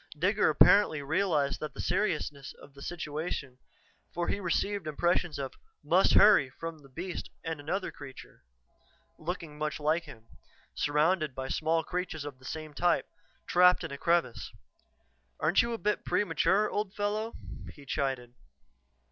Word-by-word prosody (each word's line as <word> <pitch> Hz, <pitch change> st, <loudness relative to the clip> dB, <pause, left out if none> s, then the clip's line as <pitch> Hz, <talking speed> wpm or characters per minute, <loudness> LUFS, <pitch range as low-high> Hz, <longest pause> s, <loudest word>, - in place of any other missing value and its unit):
Digger 200 Hz, +5 st, +3 dB
apparently 155 Hz, 0 st, +5 dB
realized 155 Hz, -2 st, +1 dB
the 155 Hz, -, -4 dB
seriousness 150 Hz, -8 st, -1 dB
of 140 Hz, -, -15 dB
the 140 Hz, -, -14 dB
situation, 150 Hz, -5 st, -4 dB, 0.5 s
for 175 Hz, 0 st, -2 dB
he -, -, 0 dB
received 200 Hz, 0 st, -1 dB
impressions 170 Hz, +1 st, 0 dB
of 135 Hz, -2 st, -4 dB, 0.3 s
"must -, -, +4 dB
hurry" 200 Hz, -11 st, +7 dB
from 165 Hz, +4 st, -7 dB
the 140 Hz, -2 st, -17 dB
beast 175 Hz, +6 st, -5 dB
and 160 Hz, -2 st, -4 dB
another 185 Hz, +7 st, -2 dB
creature, 135 Hz, -, -12 dB, 0.8 s
looking 160 Hz, -2 st, -5 dB
much 150 Hz, -1 st, -2 dB
like 155 Hz, +3 st, +1 dB
him, 110 Hz, -7 st, -13 dB, 0.5 s
surrounded 150 Hz, 0 st, +1 dB
by 130 Hz, 0 st, -4 dB
small 160 Hz, +1 st, +1 dB
creatures 175 Hz, -3 st, -4 dB
of 140 Hz, -3 st, -8 dB
the 130 Hz, -, -16 dB
same 155 Hz, +1 st, -6 dB
type, 175 Hz, +3 st, +2 dB, 0.4 s
trapped 180 Hz, +1 st, +5 dB
in -, -, -5 dB
a 140 Hz, -, -5 dB
crevice. 170 Hz, -8 st, +1 dB, 0.9 s
"Aren't 160 Hz, +5 st, +4 dB
you 235 Hz, -, -2 dB
a 230 Hz, -, -2 dB
bit 210 Hz, -1 st, -1 dB
premature, 185 Hz, +2 st, +2 dB
old 205 Hz, -1 st, -3 dB
fellow," 210 Hz, +2 st, -1 dB, 0.4 s
he 145 Hz, -, -14 dB
chided. 130 Hz, -4 st, -2 dB
160 Hz, 145 wpm, -30 LUFS, 145-180 Hz, 0.9 s, hurry